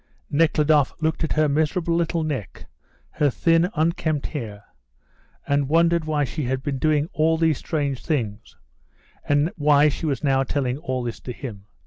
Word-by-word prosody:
Nekhludoff 150 -2 +3
looked 160 +1 -1
at 160 - 0
her 155 0 +3
miserable 160 +4 0
little 170 -1 0
neck, 135 - -5 0.5
her 145 - +1
thin, 165 +6 +2
unkempt 155 -2 0
hair, 105 -8 -6 0.8
and 140 -1 0
wondered 170 +1 +3
why 150 -2 0
she 145 +2 -3
had 130 +1 -2
been 140 -2 -2
doing 150 0 +2
all 160 +1 +2
these 160 -3 +1
strange 140 -5 -2
things, 115 -8 -3 0.7
and 145 +3 +2
why 150 0 +4
she 155 +3 -4
was 140 +1 -2
now 135 -2 +2
telling 135 -1 -1
all 130 -6 -3
this 120 -1 -5
to 125 - -7
him. 110 -6 -8
150 Hz, 160 wpm, -23 LUFS, 135-160 Hz, 0.8 s, why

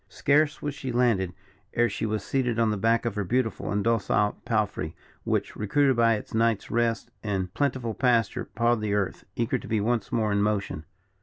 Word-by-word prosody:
Scarce 145 +1 +2
was 145 -1 -2
she 135 -2 -5
landed, 115 -7 +2 0.4
ere 120 0 +4
she 115 - -3
was 105 -2 -2
seated 125 -2 0
on 115 -2 +3
the - - 0
back 115 +4 +2
of 115 - 0
her 105 0 -2
beautiful 115 +4 -1
and 100 0 0
docile 105 -2 +1
palfrey, 105 -8 -1 0.3
which, - - -1
recruited 135 +6 +2
by 115 -1 +4
its 105 - -8
night's 115 -1 +1
rest 115 -1 0
and 95 -3 -2
plentiful 130 -5 -1
pasture, 120 -3 +1
pawed 120 0 +1
the 105 -1 0
earth, 100 -2 -2
eager 115 -1 0
to - - -10
be 110 - +1
once 115 +1 -1
more 110 -2 +1
in 100 0 +2
motion. 100 -7 -1
115 Hz, 190 wpm, -26 LUFS, 105-120 Hz, 0.4 s, ere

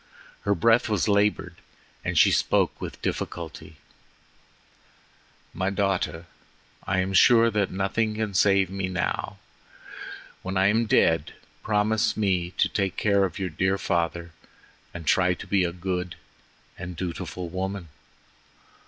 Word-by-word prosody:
Her 100 0 +2
breath 115 +6 +3
was 105 -1 +1
labored 105 0 +1 0.5
and - - -2
she - - +6
spoke - - +1
with - - -6
difficulty: 80 -2 -5 1.8
"My 95 +2 -1
daughter. 95 -5 -1 0.6
I 95 - 0
am 95 +1 0
sure 115 +3 +6
that 105 -3 0
nothing 105 +3 -1
can 110 -2 -2
save 95 0 +3
me 95 -1 -2
now. 90 0 -3 1.0
When 95 +1 -3
I 95 +1 +4
am 115 +2 +1
dead, 80 -6 +2 0.3
promise 110 +1 +1
me 95 -5 +1
to - - +3
take 95 -3 -2
care 100 -2 +3
of 90 - -5
your 95 -2 -2
dear 95 +5 0
father 85 -2 -2 0.6
and 85 -2 -8
to - - +5
try 90 -1 +2
to - - -9
be 95 -2 +2
a 85 - 0
good 90 0 -4 0.6
and 90 -1 -6
dutiful 90 0 -5
woman." 95 -1 -4
95 Hz, 135 wpm, -25 LUFS, 90-100 Hz, 1.8 s, she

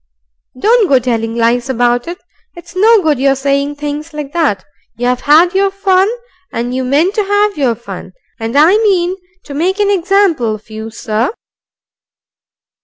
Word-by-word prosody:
Don't 445 - +3
go 270 - +5
telling 230 -2 -2
lies 240 +2 +1
about 245 0 +1
it. 345 +1 -5 0.4
It's 345 0 -13
no 430 +1 +4
good 300 -4 +1
your 275 0 +2
saying 280 +1 -1
things 295 +2 -6
like 295 -1 -6
that. 290 - 0 0.3
You've 245 +1 -1
had 325 +5 +4
your 390 +1 +2
fun, 390 0 +2 0.4
and 240 +2 -3
you 260 0 -2
meant 295 +9 +1
to 425 - 0
have 410 +1 +1
your 265 -6 0
fun. 235 - -9 0.3
And 225 +4 -2
I 330 +8 +5
mean 375 -5 +1 0.3
to 285 - -9
make 365 +7 -1
an 410 -1 +2
example 360 - +1
of 215 +1 -16
you, 220 +1 -6
Sir." 225 +2 -2
295 Hz, 165 wpm, -14 LUFS, 245-380 Hz, 0.4 s, go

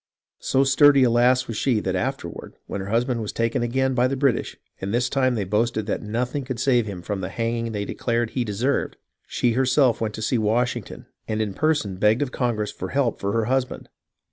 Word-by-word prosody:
So 135 - +2
sturdy 140 0 +5
a 120 - +4
lass 125 +2 +3
was 115 - -4
she 120 -3 +1
that 95 -1 -2
after 130 0 -2
ward, 85 - -10
when 100 - -5
her 95 - -6
husband 120 +2 0
was 105 - -4
taken 115 +2 -1
again 130 +2 0
by 125 0 +3
the 135 - -2
British, 135 -3 0 0.2
and 95 - -4
this 120 +2 +1
time 130 -2 +1
they 105 - -1
boasted 110 +3 0
that 105 - -2
nothing 125 +6 -2
could 130 -3 -5
save 120 -3 +2
him 90 -4 -6
from 100 0 -3
the 90 - -4
hanging 115 0 -2
they 100 -2 -3
declared 115 0 -1
he 125 - -1
deserved, 115 +6 -1 0.3
she 120 - +1
herself 130 0 +2
went 110 -2 -2
to 110 - -5
see 120 +2 +1
Washington 120 +1 -1 0.2
and 110 0 -2
in 105 -3 -1
person 145 -9 0
begged 105 +7 +3
of 135 - -5
Congress 115 -5 -1
for 95 - -6
help 130 -1 0
for 100 - -1
her 115 -1 +1
husband. 130 +1 -2
120 Hz, 220 wpm, -23 LUFS, 105-130 Hz, 0.3 s, sturdy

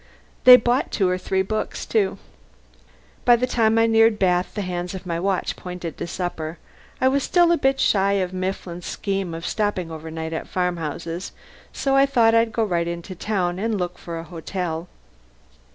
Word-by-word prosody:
They 250 0 +12
bought 245 +2 +1
two 195 - +1
or 180 0 0
three 190 +1 0
books, 215 +3 -3
too. 200 -4 +1 1.1
By 240 - +6
the 245 +2 0
time 225 -3 +2
I 225 - +5
neared 225 -1 +4
Bath 180 -2 +1
the 205 - -2
hands 180 0 -4
of 190 - -8
my 170 -1 -2
watch 190 +1 -1
pointed 180 -3 -7
to - - -3
supper. 170 -2 -4 0.4
I 260 - +3
was 275 +2 +2
still 345 +4 +3
a 340 - +4
bit 270 0 +2
shy 200 -1 +3
of 185 -2 -1
Mifflin's 185 -1 -4
scheme 195 -4 -3
of 165 +1 -7
stopping 205 -6 -1
overnight 160 0 -6
at 160 - -4
farmhouses, 170 -1 -3 0.4
so 270 -1 0
I 275 0 +5
thought 235 -4 +4
I'd 230 0 +3
go 225 +1 0
right 170 -5 0
into 170 +2 -5
the 180 - -11
town 185 -4 -1
and 220 +1 -1
look 180 -1 -4
for 170 -1 -6
a 165 - -5
hotel. 170 0 -4
185 Hz, 185 wpm, -23 LUFS, 175-225 Hz, 1.1 s, They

